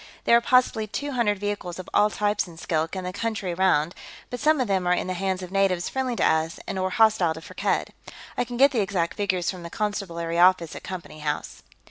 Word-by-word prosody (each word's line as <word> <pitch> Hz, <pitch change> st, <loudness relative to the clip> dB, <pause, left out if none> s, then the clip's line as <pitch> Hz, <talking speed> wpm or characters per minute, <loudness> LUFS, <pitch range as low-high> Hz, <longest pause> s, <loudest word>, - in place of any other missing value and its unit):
There 235 Hz, -, +5 dB
are 235 Hz, -, +5 dB
possibly 245 Hz, -3 st, +3 dB
two 285 Hz, +7 st, -4 dB
hundred 230 Hz, -5 st, +1 dB
vehicles 205 Hz, -3 st, -4 dB
of 185 Hz, -, -8 dB
all 210 Hz, +1 st, +4 dB
types 205 Hz, -1 st, 0 dB
in 170 Hz, -2 st, -13 dB
Skilk 160 Hz, +1 st, -1 dB
and 185 Hz, -1 st, -4 dB
the 180 Hz, -, -4 dB
country 205 Hz, -3 st, -2 dB
around, 170 Hz, -3 st, +2 dB, 0.4 s
but 245 Hz, -, -4 dB
some 305 Hz, 0 st, +3 dB
of 255 Hz, -, +1 dB
them 190 Hz, -2 st, 0 dB
are 180 Hz, -, +4 dB
in -, -, -2 dB
the 185 Hz, -, -2 dB
hands 190 Hz, 0 st, -2 dB
of 180 Hz, -, -8 dB
natives 190 Hz, -3 st, +1 dB
friendly 260 Hz, -2 st, -2 dB
to -, -, +1 dB
us 160 Hz, +1 st, +1 dB
and 190 Hz, -, -3 dB
or 185 Hz, 0 st, 0 dB
hostile 195 Hz, -5 st, +3 dB
to -, -, -7 dB
Firkked. -, -, -2 dB, 0.4 s
I -, -, +1 dB
can 245 Hz, 0 st, -6 dB
get 275 Hz, +2 st, +6 dB
the 240 Hz, -6 st, +1 dB
exact 190 Hz, -4 st, -1 dB
figures 185 Hz, -4 st, 0 dB
from 185 Hz, -2 st, -9 dB
the 170 Hz, -, -7 dB
Constabulary 170 Hz, -5 st, -2 dB
office 180 Hz, -2 st, +4 dB
at -, -, -7 dB
Company 175 Hz, -4 st, -8 dB
House." 150 Hz, -1 st, -4 dB
190 Hz, 230 wpm, -25 LUFS, 175-215 Hz, 0.4 s, get